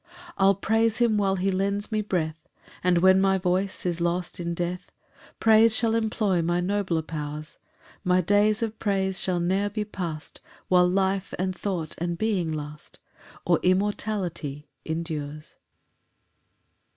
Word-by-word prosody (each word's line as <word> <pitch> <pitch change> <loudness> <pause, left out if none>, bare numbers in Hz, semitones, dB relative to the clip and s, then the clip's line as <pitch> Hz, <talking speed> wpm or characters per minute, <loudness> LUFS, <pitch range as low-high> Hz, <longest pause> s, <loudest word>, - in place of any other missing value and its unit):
6 350 +1 -21 0.2
I'll 195 +1 +5
praise 225 +3 +1
him 235 -3 +3
while 195 -2 +2
he 195 +1 0
lends 200 +3 -1
me 215 -1 +1
breath, 160 -6 -3 0.3
And 180 -1 +3
when 190 0 +6
my 195 0 +3
voice 185 +1 -1
is 175 -1 -1
lost 175 +1 -1
in 170 0 -3
death 175 +1 -4 0.5
Praise 225 0 +5
shall 225 -1 +2
employ 215 -5 +1
my 175 +1 0
nobler 180 -3 0
powers: 150 -1 -6 0.4
My 180 -1 +3
days 205 +4 +2
of 220 -1 -4
praise 190 -2 0
shall 180 -2 0
ne'er 190 +4 +1
be 210 +1 -3
past 170 -7 -6 0.3
While 180 -1 +5
life 190 +1 0
and 185 0 -1
thought 175 -5 -3
and 170 0 -2
being 195 -6 0
last, 150 0 -7 0.5
Or - - +3
immortality 185 -6 -1 0.2
endures. 155 -2 -5
185 Hz, 145 wpm, -26 LUFS, 170-205 Hz, 0.5 s, when